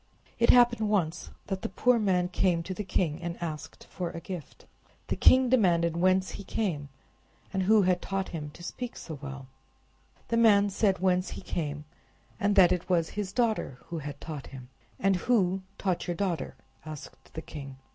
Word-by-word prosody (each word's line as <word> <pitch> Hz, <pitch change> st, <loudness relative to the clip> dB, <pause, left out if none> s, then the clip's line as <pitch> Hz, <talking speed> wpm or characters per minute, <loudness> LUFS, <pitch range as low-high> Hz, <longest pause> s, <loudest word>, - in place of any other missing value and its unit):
It 235 Hz, -, +3 dB
happened 240 Hz, -3 st, +5 dB
once 180 Hz, -5 st, 0 dB, 0.2 s
that 195 Hz, -2 st, -3 dB
the -, -, -3 dB
poor 245 Hz, +5 st, +3 dB
man 185 Hz, -4 st, +2 dB
came 180 Hz, -2 st, +1 dB
to 185 Hz, -, -4 dB
the 210 Hz, -, -4 dB
king 175 Hz, -4 st, -1 dB
and 170 Hz, 0 st, -4 dB
asked 155 Hz, -3 st, -6 dB
for 180 Hz, -2 st, -3 dB
a 165 Hz, -, -6 dB
gift. 175 Hz, -3 st, -8 dB, 0.4 s
The -, -, +1 dB
king 260 Hz, 0 st, +6 dB
demanded 175 Hz, -9 st, +3 dB
whence 185 Hz, +2 st, +2 dB
he 200 Hz, -, -7 dB
came, 165 Hz, -10 st, -2 dB, 0.6 s
and 190 Hz, -, +1 dB
who 210 Hz, +2 st, +5 dB
had 180 Hz, -1 st, +2 dB
taught 195 Hz, -1 st, -2 dB
him 150 Hz, -3 st, -5 dB
to 175 Hz, -, -12 dB
speak 245 Hz, +6 st, -6 dB
so 155 Hz, -4 st, -7 dB
well. 135 Hz, -1 st, -7 dB, 0.8 s
The 230 Hz, -, +1 dB
man 205 Hz, -3 st, +5 dB
said 195 Hz, -1 st, +2 dB
whence 185 Hz, 0 st, +1 dB
he -, -, -7 dB
came, 150 Hz, -5 st, -4 dB, 0.5 s
and 205 Hz, 0 st, +2 dB
that 185 Hz, -3 st, +7 dB
it 180 Hz, 0 st, -1 dB
was 170 Hz, -3 st, +2 dB
his 205 Hz, -2 st, -4 dB
daughter 220 Hz, -, 0 dB
who 170 Hz, -, -3 dB
had 145 Hz, -1 st, -7 dB
taught 150 Hz, -4 st, -7 dB
him. 130 Hz, -2 st, -11 dB, 0.3 s
"And 195 Hz, -1 st, +3 dB
who 190 Hz, -3 st, +2 dB, 0.2 s
taught 185 Hz, -2 st, -1 dB
your 175 Hz, -, -1 dB
daughter?" 170 Hz, -7 st, -2 dB, 0.3 s
asked 155 Hz, -2 st, -10 dB
the 160 Hz, -, -4 dB
king. 140 Hz, -3 st, -8 dB
180 Hz, 185 wpm, -29 LUFS, 165-200 Hz, 0.8 s, that